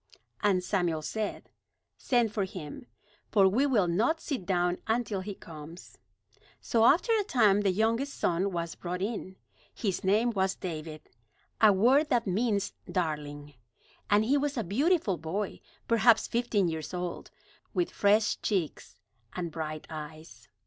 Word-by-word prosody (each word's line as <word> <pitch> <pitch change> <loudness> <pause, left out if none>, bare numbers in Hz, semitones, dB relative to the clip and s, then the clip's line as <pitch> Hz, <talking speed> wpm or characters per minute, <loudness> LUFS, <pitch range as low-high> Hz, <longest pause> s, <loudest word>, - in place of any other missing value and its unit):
And 195 -3 +2
Samuel 175 -5 0
said: 215 +5 -4 0.4
"Send 240 -4 +1
for 205 - 0
him; 185 - -8 0.4
for 195 -3 +5
we 245 +9 +2
will 215 -9 +2
not 225 - +1
sit 260 - -4
down 180 -2 +1
until 220 -4 0
he 200 +1 -6
comes." 160 +1 -11 0.6
So 225 -1 +2
after 365 - +4
a 430 -2 +2
time 215 - +3
the 200 - +2
youngest 225 +8 0
son 180 +3 0
was 170 -2 -3
brought 180 +1 -4
in. 200 -3 -4 0.4
His 195 -5 -3
name 215 +5 +3
was 190 -3 0
David, 155 -3 -7 0.5
a 215 -2 +8
word 255 +10 +4
that 235 -1 +2
means 200 +1 0 0.2
"darling," 150 -4 -3 0.6
and 210 +1 +4
he 275 +5 +3
was 290 0 -2
a 230 - 0
beautiful 215 - +1
boy, 185 +6 -3 0.3
perhaps 230 0 +4
fifteen 230 -5 +1
years 160 +1 -4
old, 180 -1 -5 0.5
with 350 -1 0
fresh 205 +1 +2
cheeks 170 - -2 0.4
and 175 -2 -4
bright 155 -1 -5
eyes. 155 -6 -9
195 Hz, 145 wpm, -29 LUFS, 170-230 Hz, 0.6 s, a